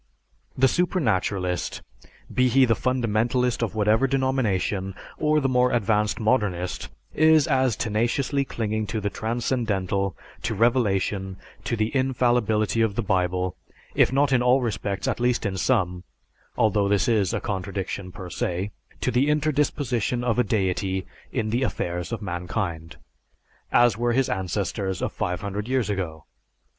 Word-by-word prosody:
The 135 +1 +5
supernaturalist, 100 - 0 0.5
be 125 0 +3
he 130 +2 +5
the 115 - +3
fundamentalist 120 0 0
of 110 -4 -2
whatever 110 +5 +3
denomination, 110 -8 0 0.2
or 155 0 +3
the 135 - +1
more 125 -1 +3
advanced 105 -2 +1
modernist, 105 -6 0 0.2
is 155 -1 +5
as 130 -4 +2
tenaciously 120 +6 0
clinging 110 -4 -2
to 110 - -2
the 100 -1 -2
transcendental, 105 - -1 0.2
to 110 - -2
revelation, 100 -4 +1 0.3
to 120 - 0
the 110 +3 -1
infallibility 120 -4 +2
of 110 -3 +1
the 120 - -1
Bible, 90 -2 0 0.4
if - - +4
not 140 +1 +2
in 125 -2 +4
all 125 +2 +4
respects 105 -5 -2
at - - -1
least 120 -1 +1
in 100 -1 -1
some 90 -4 0 0.5
(although 105 -2 +3
this 100 0 +2
is 105 -6 +2
a - - -1
contradiction 95 -1 -4
per 90 -1 -9
se), 90 +4 -2 0.3
to - - +1
the 130 +5 +2
interdisposition 145 -5 0
of 120 -1 +1
a - - +5
deity 95 -2 -1 0.3
in 110 -1 -1
the 120 +3 +1
affairs 90 -9 -2
of 115 -2 -4
mankind, 85 -2 -4 0.8
as 120 -3 +4
were 120 0 +1
his 130 +1 +2
ancestors 95 -1 -2
of - - -2
five 90 0 -2
hundred 100 +2 -4
years 125 -5 0
ago. 85 -6 -4
110 Hz, 145 wpm, -25 LUFS, 95-125 Hz, 0.8 s, The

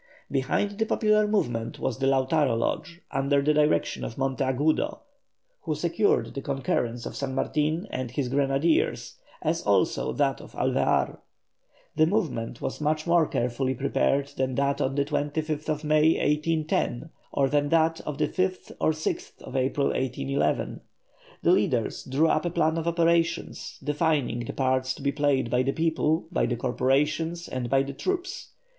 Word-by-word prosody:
Behind 175 - 0
the 220 - +2
popular 215 -1 +3
movement 120 - -1
was 125 -3 -2
the 135 - +1
Lautaro 135 -1 +2
Lodge 170 +8 -2
under 140 +1 +2
the 150 +2 +2
direction 150 0 +1
of 115 - -5
Monteagudo, 135 - 0 0.6
who - - -2
secured 425 +2 +1
the 140 - -4
concurrence 120 -3 -2
of - - -6
San 135 -1 -3
Martin 155 +7 0
and 130 -2 -3
his 130 +2 -2
grenadiers, 140 +4 +1 0.3
as - - 0
also - - +1
that - - 0
of - - -13
Alvear. - - +1 0.8
This 155 - +4
movement 130 - -2
was - - -3
much 155 +1 0
more 170 -2 +4
carefully 125 +2 -1
prepared 140 +1 +1
than 130 -1 0
that 140 +1 +1
of 135 - 0
the 140 -1 +1
25th 150 +1 -2
May, 155 +1 +4
1810, 155 -2 0 0.2
or 135 - +2
than 145 +1 +1
that 165 0 +2
of 150 -2 -5
the 150 - +1
5th 185 +3 -2
and 155 - +3
6th 155 -3 -5
April, 135 +2 +1
1811. 135 +2 -1 0.6
The - - +5
leaders 125 - +1
drew 140 +5 +2
up 155 0 +1
a - - +1
plan 165 -1 +1
of 165 - -4
operations, 170 0 0
defining 145 -5 0
the - - -5
parts 130 -1 0
to - - -11
be 140 - +2
played 140 -4 +1
by 125 - +3
the 135 +1 +1
people, 160 -1 +1
by 175 - +1
the 120 - -1
corporations, 145 +7 0
and 125 -2 -4
by 135 +1 +3
the 140 0 -6
troops. 370 - -3
145 Hz, 160 wpm, -26 LUFS, 130-160 Hz, 0.8 s, The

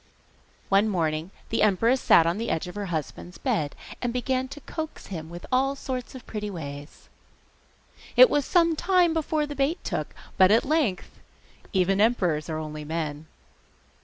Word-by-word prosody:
One 200 +2 +4
morning 160 -3 -1 0.2
the 225 - 0
empress 230 +6 +3
sat 165 - +6
on 170 +5 0
the 230 - -2
edge 165 +3 -1
of 180 - -7
her 205 -1 -4
husband's 170 +1 -5
bed, 150 -3 -1 0.3
and 245 - -1
began 255 +1 -1
to 285 +2 -9
coax 315 +3 -6
him 160 -2 -6
with 175 +1 -9
all 270 +2 +2
sorts 260 -2 -5
of 255 - -10
pretty 210 -1 -4
ways. 145 -5 -8 1.1
It - - +10
was 290 -8 +1
some 335 +1 +3
time 350 0 +3
before 310 -1 0
the 290 - -6
bait 280 +5 0
took, - - -4 0.2
but 185 -1 +7
at 220 +3 +4
length 275 - -1 0.5
even 190 +1 +2
emperors 180 -9 +1
are 155 - -2
only 155 -1 -6
men! 155 -1 -4
205 Hz, 165 wpm, -26 LUFS, 165-270 Hz, 1.1 s, It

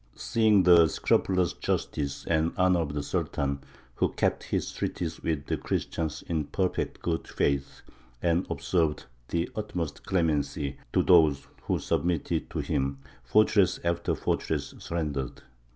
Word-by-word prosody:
Seeing 110 -4 +3
the 85 -2 +7
scrupulous 90 +2 +1
justice 70 -2 -2
and 80 0 +1
honour 90 -1 +4
of 75 -3 -2
the 75 - -1
Sultan, 70 -1 -1 0.3
who - - +1
kept - - 0
his - - -2
treaties 80 -2 -3
with 75 -3 -1
the - - -1
Christians 80 -3 -3
in 80 -3 -1
perfect 90 +5 -2
good 80 -1 -1
faith, 70 -1 -1 0.4
and 85 +4 +1
observed 80 -4 0 0.2
the 85 +1 -1
utmost 90 -8 -4
clemency 75 -5 0
to - - +3
those 80 -6 +5 0.2
who - - +1
submitted 85 -3 -1
to - - -2
him, 70 0 -1 0.3
fortress 100 - +3
after 85 0 0
fortress - - -2
surrendered. 75 -6 -3
80 Hz, 135 wpm, -28 LUFS, 70-90 Hz, 0.4 s, the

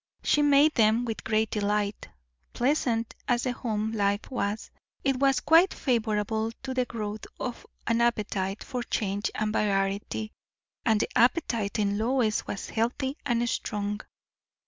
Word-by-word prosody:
She 295 - +3
made 290 +1 +5
them 225 +1 +3
with 225 -2 -4
great 220 0 +1
delight. 205 0 -1 0.4
Pleasant 240 -3 +1
as 245 -1 +2
the 255 - 0
home 220 -3 -2
life 205 0 0
was, 210 -3 -2 0.3
it 270 -1 +2
was 270 -2 +3
quite 330 +4 +5
favourable 220 -3 0
to 265 -1 -3
the 255 -1 +1
growth 215 -3 -5
of 245 -2 -5 0.2
an 230 0 +2
appetite 205 -4 0
for 250 -3 -4
change 205 -3 -1
and 215 0 -1
variety; 200 +1 0 0.5
and 220 -3 +3
the - - 0
appetite 235 -5 +2
in 205 -1 +1
Lois 230 -2 +1
was 195 - -5
healthy 245 +4 -1
and 240 -1 +1
strong. 205 -2 -2
225 Hz, 145 wpm, -28 LUFS, 210-245 Hz, 0.5 s, made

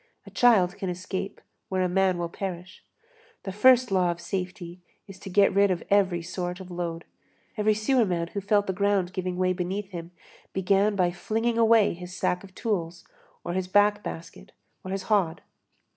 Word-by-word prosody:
A - - -12
child 200 -7 +4
can 190 -3 -3
escape 185 +2 -5 0.3
where 185 -1 0
a - - +2
man 185 0 +2
will 170 -1 -2
perish. 180 0 -7 0.6
The 190 - -4
first 250 +4 +5
law 185 -2 +3
of 170 0 -3
safety 180 0 -5 0.3
is 195 -1 -12
to 195 - -9
get 200 +1 +4
rid 200 +1 +4
of 180 -2 -1
every 190 -4 +3
sort 180 +1 -4
of 185 -1 -10
load. 170 -1 -4 0.5
Every 215 -1 +2
sewerman 210 -7 +1
who 200 - -4
felt 205 +1 +2
the 190 - -2
ground 195 -1 +1
giving 180 -1 -3
way 185 0 +2
beneath 190 +2 -3
him 170 -2 -7 0.4
began 195 +2 +2
by 180 -2 +2
flinging 225 +5 -1
away 225 -2 +5
his 180 +1 -9
sack 180 - 0
of 190 -1 -14
tools, 175 -6 -3 0.4
or 175 - -4
his 185 0 -2
back 205 +2 +3
basket, 165 - -9 0.3
or 185 - -7
his 195 0 -3
hod. 190 -6 0
190 Hz, 180 wpm, -26 LUFS, 180-205 Hz, 0.6 s, first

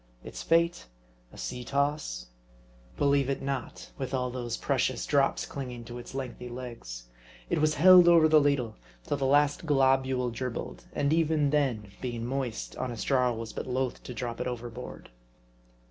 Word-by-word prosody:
Its - - -7
fate? 170 +1 +2 0.4
A - - -14
sea 60 - -5
toss? 140 - -1 0.7
Believe 140 -1 +2
it 135 - -1
not; 135 -3 -5
with 135 0 -2
all 125 -1 -1
those 120 -2 -3
precious 130 -3 0
drops 140 -2 +2
clinging 125 -4 -6
to 120 +1 -8
its 120 - -10
lengthy 125 -2 -5
legs. 120 - -7 0.5
It - - +2
was 155 0 +3
held 180 +2 +8
over 165 -2 +7
the 155 -1 +6
ladle 140 -6 0 0.3
till 145 - -2
the 135 -1 0
last 145 +3 +3
globule 130 -3 +2
dribbled; 120 0 -5
and 145 +1 +1
even 160 -3 +2
then, 125 -9 0
being 120 -2 -3
moist, 130 -2 -3
honest 120 -3 -3
Jarl 125 -3 +2
was 115 -1 -6
but - - -5
loth 130 0 -2
to 125 - -8
drop 120 0 -4
it - - -2
overboard. 120 - -7
130 Hz, 160 wpm, -29 LUFS, 120-145 Hz, 0.7 s, held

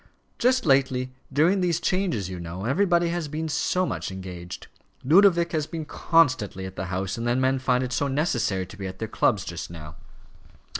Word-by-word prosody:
"Just 255 -1 +2
lately, 130 -3 +2 0.2
during 165 +8 +3
these 175 -2 +1
changes, 175 - 0
you 90 -1 -6
know, 85 +3 -6
everybody 170 +5 +2
has 170 -2 -2
been 155 +2 -3
so 160 +4 0
much - - -3
engaged. 90 -2 -8 0.4
Ludovic 170 +3 +5
has 155 -2 -1
been 160 -2 -5
constantly 130 - +1
at 95 0 -8
the 95 - -4
House, 95 +3 -3
and 120 - -2
then 120 +2 +2
men 130 0 +2
find 130 -1 +1
it 130 0 -3
so 140 +2 0
necessary 130 - 0
to 105 - -13
be 95 -1 -5
at 95 0 -8
their 110 - -4
clubs 100 -2 +1
just 85 -1 -6
now." 80 -2 -10
130 Hz, 190 wpm, -25 LUFS, -, 0.4 s, Ludovic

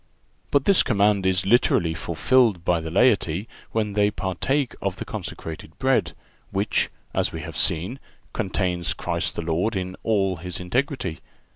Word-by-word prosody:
But 140 -1 +2
this 200 -2 +6
command 100 -3 +2
is 95 0 +1
literally 95 -6 +3
fulfilled 90 +3 +2
by 90 -1 +3
the 80 - -5
laity 100 -2 +2 0.2
when 105 -2 -1
they 105 0 +3
partake 120 - -1
of - - -1
the - - -6
consecrated 80 0 -7
bread, 130 -1 +2 0.4
which, 100 +2 0 0.2
as - - +1
we - - -5
have - - -7
seen, 90 +11 0 0.3
contains 90 -3 -1
Christ - - -2
the 80 - -3
Lord 90 +7 0
in 95 -1 -3
all 95 -4 +1
His 90 +1 -6
integrity. 95 - -1
95 Hz, 150 wpm, -24 LUFS, 90-115 Hz, 0.4 s, this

